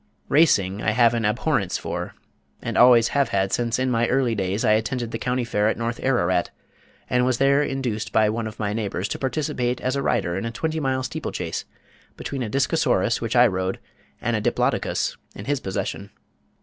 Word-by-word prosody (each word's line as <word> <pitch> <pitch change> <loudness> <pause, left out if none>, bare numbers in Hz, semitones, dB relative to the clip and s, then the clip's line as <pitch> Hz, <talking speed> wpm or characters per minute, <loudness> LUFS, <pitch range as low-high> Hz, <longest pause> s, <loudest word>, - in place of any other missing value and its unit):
Racing 105 - +3
I 110 - +1
have 120 0 +4
an 115 -2 0
abhorrence 105 - 0
for, - - -5 0.4
and - - -4
always 120 -2 +6
have 140 -3 +1
had 95 -3 0
since 115 -1 0
in 130 0 0
my 120 0 +2
early 125 -2 +1
days 100 0 -1
I - - +4
attended 115 +2 0
the 115 - -4
county 125 0 -1
fair 105 -3 0
at 110 - 0
North 115 +1 -3
Ararat, 95 -9 +1 0.6
and 125 0 +2
was 125 -1 +1
there 140 +2 +4
induced 120 -7 -2
by 110 +1 +4
one 110 +1 -2
of 105 - -8
my 105 -2 -1
neighbors 100 -4 -2
to - - -4
participate 130 -3 -1
as 130 +1 -1
a 140 - 0
rider 85 -9 0
in 95 - -3
a - - -1
twenty 160 +7 -2
mile 130 -2 -1
steeplechase - - -4 0.5
between 135 - -5
a 115 - -2
Discosaurus 135 +5 +1
which - - -2
I - - +7
rode, 95 0 -1 0.4
and - - -1
a - - -1
Diplodocus - - 0 0.2
in 100 - -8
his 145 +1 0
possession. 100 0 -4
115 Hz, 195 wpm, -23 LUFS, 105-130 Hz, 0.6 s, I